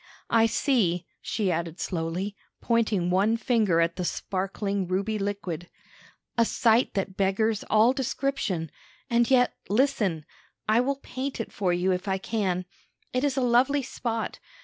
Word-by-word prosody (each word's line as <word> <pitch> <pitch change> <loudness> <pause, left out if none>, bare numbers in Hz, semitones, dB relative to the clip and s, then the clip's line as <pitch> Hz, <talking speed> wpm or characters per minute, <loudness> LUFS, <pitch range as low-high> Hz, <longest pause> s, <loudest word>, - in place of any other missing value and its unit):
I 225 -1 +5
see," 195 - +1 0.2
she 200 -5 -1
added 170 +1 -3
slowly, 180 +3 -2 0.2
pointing 220 -7 +1
one 205 +5 +3
finger 220 -8 +2
at 170 0 +1
the 180 - -2
sparkling 195 +2 -2
ruby 200 +4 -1
liquid, 195 -4 -4 0.7
"a - - +7
sight 230 +1 +2
that 195 -1 -2
beggars 205 +3 +1
all 220 +4 +5
description; 260 - -2 0.4
and 235 0 +3
yet, 250 -2 +4 0.2
listen! 210 - +1 0.4
I 215 +2 +4
will 275 +2 0
paint 265 +1 -4
it 230 - -4
for 190 -3 0
you, 180 +2 +1
if 180 +2 -2
I 190 0 +1
can. 190 -3 -1 0.5
It 255 +1 0
is 285 -2 +1
a - - +2
lovely 255 +3 +3
spot. 230 -2 -3
205 Hz, 150 wpm, -27 LUFS, 185-235 Hz, 0.7 s, a